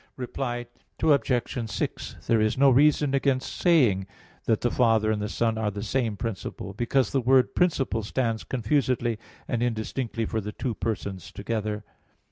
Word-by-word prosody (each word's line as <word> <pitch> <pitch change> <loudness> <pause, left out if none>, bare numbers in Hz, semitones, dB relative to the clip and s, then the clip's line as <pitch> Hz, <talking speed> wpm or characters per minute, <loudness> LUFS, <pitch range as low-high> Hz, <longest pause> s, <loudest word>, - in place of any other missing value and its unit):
Reply 120 -1 -3 0.4
Obj. 125 -6 +1
6: - - -3
There 115 -2 +3
is 110 +2 +1
no 135 0 +6
reason 145 +1 +4
against 135 -1 0
saying 120 - +3 0.4
that 110 -2 +2
the 120 - +1
Father 110 -3 +3
and 105 -1 -1
the 105 - -2
Son 115 0 0
are 110 -2 +1
the 100 0 -5
same 115 -3 -1
principle, 100 -3 -5
because 120 +5 +1
the 135 - +1
word 130 +1 +4
"principle" 140 -10 +1
stands 115 +1 -1
confusedly 120 -2 0 0.3
and 120 - -1
indistinctly 115 0 -2
for 110 +1 -2
the 105 +1 -6
two 125 +2 -3
Persons 100 -5 -4
together. 105 0 -3
115 Hz, 155 wpm, -26 LUFS, 110-130 Hz, 0.4 s, no